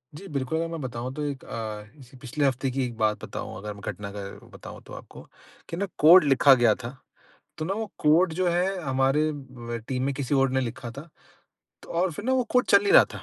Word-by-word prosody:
जी, 195 +6 -10
बिल्कुल 140 -1 -2
अगर 165 +1 -1
मैं 165 0 -6
बताऊँ 125 0 -5
तो 150 - -4
एक 140 -2 -4
अ, 110 -2 -5
जैसे 135 -2 -16
पिछले 145 +2 -1
हफ़्ते 135 0 0
की 135 +1 -1
एक 120 -2 -7
बात 110 -1 0
बताऊँ - - -7
अगर 105 +1 -6
मैं 100 - -13
घटना 100 -1 -8
का 100 - -5 0.3
बताऊँ - - -10
तो - - -11
आपको - - -11 0.5
कि 165 - -5
ना 200 - 0
कोड 170 +4 +8
लिखा 140 -1 +6
गया 120 -4 +4
था, 120 +3 -6 0.6
तो 155 - -2
ना 190 +4 -2
वो 220 +1 -3
कोड 160 +3 +4
जो 180 - +2
है 180 +2 0
हमारे 135 +2 +1
म 125 -4 -7
टीम 130 -1 -2
में 140 0 -1
किसी 140 +1 -2
और 135 -1 +3
ने 130 0 +1
लिखा 120 -1 -5
था। 140 +7 -10 0.7
तो - - -14
और 175 +2 +1
फ़िर 205 - -8
ना 260 - +2
वो 255 -1 +2
कोड 250 0 +3
चल 200 0 +5
नहीं 205 - +1
रहा - - +9
था। - - -8
135 Hz, 240 wpm, -26 LUFS, 125-165 Hz, 0.7 s, रहा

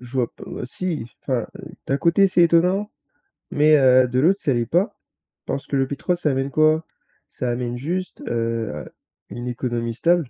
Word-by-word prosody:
je 125 -1 -12
vois 120 -2 +1
p - - -16
heu, - - -6
si 155 -2 -4 0.2
enfin, 125 -5 -1
heu, - - -10 0.2
d'un 135 - +1
côté, 170 +5 +4
c'est 180 -2 +3
étonnant, 180 +5 +3 0.6
mais, 155 +1 +5
heu, 130 -1 +5
de 125 +1 0
l'autre, 185 +8 +3
ça 140 - +1
l'est 120 -1 0
pas. 180 - 0 0.5
Parce 140 - -4
que - - -2
le 135 -1 +2
pétrole 175 +6 -2
ça 150 -4 0
amène 135 +1 -1
quoi? 155 +2 +3 0.4
Ça 125 - -4
amène 120 0 -3
juste, 180 +8 -4
heu, 115 -1 -1
à - - -7 0.4
une 120 +1 -6
économie 120 -1 -2
stable 170 +2 +1
135 Hz, 190 wpm, -22 LUFS, 120-170 Hz, 0.6 s, mais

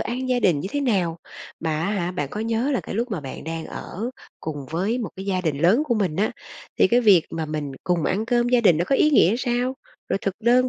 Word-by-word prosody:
ăn 255 +2 -3
gia 250 -1 +2
đình 165 -7 +3
như 190 - -4
thế 290 - 0
nào? 185 -11 0 0.4
Mà 155 -2 -1
á 195 - 0
hả, 180 -4 -1
bạn 145 -6 -3
có 210 - -4
nhớ 230 +4 0
là 260 - +1
cái - - -7
lúc 235 +3 -1
mà 195 -7 -2
bạn 135 -2 -8
đang 165 0 -4
ở 220 +7 -5 0.3
cùng 145 -3 -5
với 195 +9 0
một 230 - -3
cái 190 +1 -7
gia 185 -2 0
đình 155 -6 -1
lớn 185 - +4
của 255 -6 +1
mình 190 -8 0
á, 205 +4 +1 0.5
thì - - +5
cái 240 +1 +4
việc 200 -8 +6
mà 160 -1 -3
mình 150 -2 -4
cùng 175 -2 +1
ăn 210 +4 0
cơm 240 0 +2
gia 245 -1 +4
đình 185 -8 +5
nó 175 - +1
có 270 - +1
ý 305 - +4
nghĩa 225 - +5
sao? 245 +1 -1 0.3
Rồi - - 0
thực 195 - -1
đơn 245 +3 +4
200 Hz, 265 wpm, -23 LUFS, 165-240 Hz, 0.5 s, việc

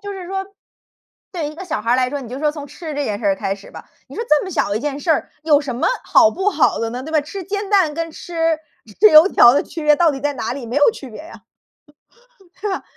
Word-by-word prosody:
就 405 0 -6
是 370 -2 -8
说 385 0 -3 0.9
对 320 -5 -3
一 305 - -12
个 375 - -7
小 315 - -3
孩 230 - -2
儿 - - +4
来 255 -1 +1
说， 285 -1 -4
你 245 - -9
就 255 - -6
说 300 +1 +1
从 295 -2 -8
吃 310 +1 -8
这 290 0 -2
件 205 -1 -3
事 215 - -3
儿 195 - +3
开 195 0 -2
始 195 - -15
吧， - - -12 0.2
你 - - -12
说 460 - -3
这 300 -1 +3
么 380 - -6
小 335 - 0
的 205 - 0
一 - - -2
件 290 +1 -4
事 330 - -1
儿， 305 - +1
有 300 -2 +4
什 275 -4 -5
么 - - +1 0.2
好 325 -1 +5
不 385 +3 -1
好 280 - +2
的 230 0 -2
呢， 250 +2 -5
对 315 +4 -8
吧？ 310 - +3
吃 370 +6 -7
煎 400 +2 -4
蛋 370 -7 +3
跟 330 +1 -4
吃 330 -2 -2 0.4
吃 430 - +8
油 310 +5 +8
条 240 - +6
的 290 - +2
区 325 - -8
别 300 -1 +5
到 335 -1 +4
底 270 - -6
在 290 0 -1
哪 230 -2 -3
里， 270 -4 -7
没 240 +5 -5
有 290 +8 +5
区 275 - -10
别 215 - -10
啊， 325 - -13 1.2
对 415 -1 -2
吧？ - - -4
300 Hz, 305 characters per minute, -19 LUFS, 265-345 Hz, 1.2 s, 吃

